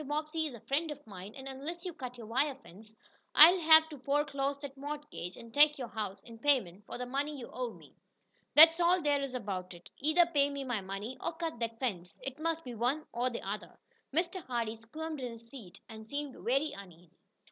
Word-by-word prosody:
Bobbsey 310 +2 -1
is 265 - -8
a - - -11
friend 310 +4 -1
of 295 -1 -7
mine 200 -1 -10
and 265 0 -8
unless 295 +7 -6
you 360 - -4
cut 255 -5 -7
your 235 - -9
wire 265 +5 +1
fence, 215 -4 -16 0.4
I'll 345 +5 +10
have 320 -1 +7
to 295 -3 -9
foreclose 280 0 0
that 280 -2 -7
mortgage, 290 - -6
and 230 -1 -12
take 295 +2 +6
your 250 -4 -5
house 205 -3 -4
in 230 -1 -12
payment 210 -9 +1
for - - -6
the 250 - -4
money 280 +4 -2
you 245 - -9
owe 250 -2 -3
me. - - -17 0.6
That's 325 +2 +10
all 350 0 +3
there 290 -1 +2
is 270 -2 -4
about 190 -6 -4
it. 170 - -15
Either 315 +5 +4
pay 285 -4 +2
me 280 -1 -4
my 245 -5 -2
money 195 +6 -6
or 335 - -3
cut 325 -6 -4
that 230 -1 -3
fence. 180 -9 -3
It 270 +2 -6
must 330 0 -1
be 250 - -7
one 250 +7 0
or 245 +2 +1
the 235 -5 -6
other." 205 +2 -5 0.3
Mr. 345 +4 0
Hardee 230 -3 -2
squirmed 305 +7 -6
in 250 -2 -4
his 230 0 -13
seat, 200 -9 -11
and 220 -1 -10
seemed 285 +2 -4
very 275 +5 0
uneasy. 180 -3 -13
270 Hz, 215 wpm, -32 LUFS, 225-300 Hz, 0.6 s, I'll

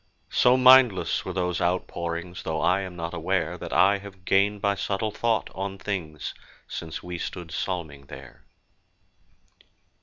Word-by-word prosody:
So 125 +1 +5
mindless 130 -5 +6
were - - -5
those 90 -2 -1
outpourings!— 85 0 -2
Though 80 -1 -2
I 95 +2 +3
am 95 -2 -7
not 85 -1 -5
aware - - -1
That - - -7
I 100 +1 +4
have 95 -2 -13
gained 100 +2 +3
by 100 0 +1
subtle 100 +2 -2
thought 115 0 0
on 95 0 -4
things 85 -8 -4 0.3
Since 80 -1 -6
we 90 -1 -6
stood 85 -1 -5
psalming 80 -5 -4
there. 65 -1 -12
90 Hz, 145 wpm, -26 LUFS, 85-100 Hz, 0.3 s, mindless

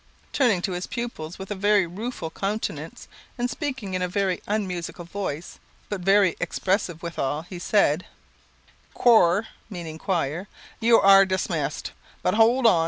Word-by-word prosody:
Turning 225 -10 +2
to 195 - -1
his 180 0 -4
pupils, 190 -9 -5
with 190 +1 -8
a - - +1
very 205 -1 +3
rueful 180 -1 -5
countenance, 205 +5 -4 0.3
and 245 0 -1
speaking 265 - -4
in 185 - -1
a 180 - +1
very 190 0 -1
unmusical 180 -4 -3
voice, 170 -3 -5 0.3
but 205 -3 -3
very 195 0 +4
expressive 185 -4 -1
withal, 155 -3 -2
he 175 0 -9
said 180 -4 +2 0.9
"Chore 220 -4 +5 0.2
(meaning 165 -5 -7
choir), 175 -1 -1 0.3
you 230 0 +5
are 195 0 +8
dimissed. 170 -6 -2 0.3
But, 180 - +2
hold 235 +3 +4
on! 190 -7 +6
190 Hz, 145 wpm, -25 LUFS, 175-210 Hz, 0.9 s, are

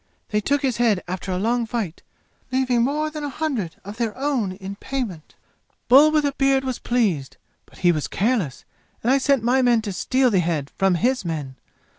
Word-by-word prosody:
They 210 -1 0
took 285 +6 0
his 255 -4 0
head 225 -6 +2
after 185 +1 -4
a 180 - -1
long 230 +4 0
fight, 220 -8 -3 0.5
leaving 255 -2 +2
more 300 +5 0
than 305 -1 -6
a 290 - -2
hundred 260 - -3
of 205 +2 -8
their 230 -3 -2
own 260 -9 -1
in 195 +1 -7
payment. 230 - -5 0.5
"Bull 280 +5 +8
with 305 -1 +2
a 285 - +1
beard 270 -1 +2
was 260 -2 -3
pleased. 200 - 0 0.3
But - - -19
he 175 - +7
was 155 -3 -2
careless, 200 - -1 0.4
and 240 - +2
I 275 - +4
sent 275 -3 +2
my 250 +3 +3
men 240 -3 +3
to 205 -3 -4
steal 255 +6 +2
the 195 - +3
head 160 -5 -1
from 195 -2 +2
his 250 +7 +1
men. 150 -6 -4
235 Hz, 200 wpm, -23 LUFS, 190-265 Hz, 0.5 s, Bull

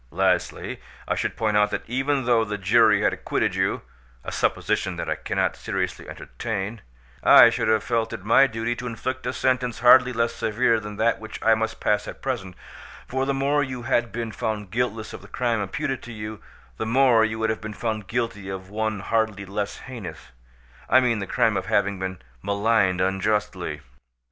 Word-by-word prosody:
"Lastly, 95 +4 0 0.3
I - - +1
should - - -2
point 110 -2 0
out 105 0 +4
that - - -4
even 135 +2 0
though 120 -2 +4
the 105 -1 -3
jury 105 +1 +4
had - - +3
acquitted - - -1
you—a - - -4
supposition - - 0
that - - -4
I - - +1
cannot - - -1
seriously - - -4
entertain—I 95 - +2
should - - -1
have 110 0 +3
felt 115 -2 -1
it 95 - -7
my 115 +5 +6
duty 115 0 -2
to 125 - -5
inflict 125 +2 -4
a - - 0
sentence 125 -3 0
hardly 125 +1 +7
less 115 -1 0
severe 115 +1 +1
than 105 -1 -7
that 115 +3 +1
which 110 0 -8
I 115 - +5
must 110 0 -2
pass 105 0 +1
at - - -8
present; 105 -9 -3 0.5
for 130 +1 -1
the 140 - +1
more 140 +2 +2
you 130 -3 -4
had 120 0 +1
been 115 -1 -4
found 105 -3 -4
guiltless 115 -2 -2
of - - -8
the - - -13
crime 120 -3 -1
imputed 135 +6 -3
to 120 - -10
you, 105 -1 -7 0.4
the 110 - -3
more 120 -1 +5
you 110 0 -1
would 110 0 +1
have 110 - -4
been 110 0 -6
found 110 -3 -3
guilty 115 -3 -3
of 95 0 -7
one 110 -1 -2
hardly 110 -2 -1
less 100 +1 -4
heinous—I 60 - -3
mean 120 -4 +1
the 100 - -4
crime - - +2
of - - -2
having 100 -1 +1
been 95 -2 -5 0.2
maligned 100 -2 +2
unjustly. 95 +3 -1
110 Hz, 185 wpm, -24 LUFS, 100-120 Hz, 0.5 s, hardly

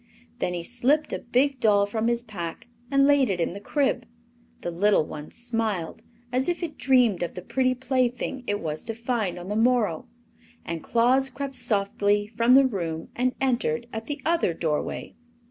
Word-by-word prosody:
Then 180 - -1
he 170 - -4
slipped 250 - +1
a - - -2
big 260 +3 +1
doll 205 -3 +4
from 220 +2 -1
his 235 0 0
pack 180 -4 -6 0.2
and 275 0 +4
laid 280 -4 +4
it 185 -2 -1
in 170 - 0
the 200 - -7
crib. 255 +1 0 0.5
The 175 - -3
little 195 -1 +3
one 150 0 -8
smiled, 225 -8 -2 0.3
as 260 +5 +1
if 350 0 -2
it 320 -3 -4
dreamed 245 -8 +3
of 175 - -3
the 180 - -6
pretty 255 +4 +1
plaything 255 0 -1
it 205 0 0
was 155 -3 -4
to 225 - -3
find 230 -6 -2
on 175 +1 -8
the 205 - -2
morrow, 225 -7 +2 0.6
and 165 -1 -4
Claus 255 +3 +2
crept 275 +2 -5
softly 205 -2 +1
from 230 +4 +3
the 275 0 +7
room 170 -9 -3
and 255 +1 0
entered 240 - 0
at 220 0 -5
the 290 0 -3
other 330 - +2
doorway. 155 -3 -2
230 Hz, 180 wpm, -26 LUFS, 195-255 Hz, 0.6 s, the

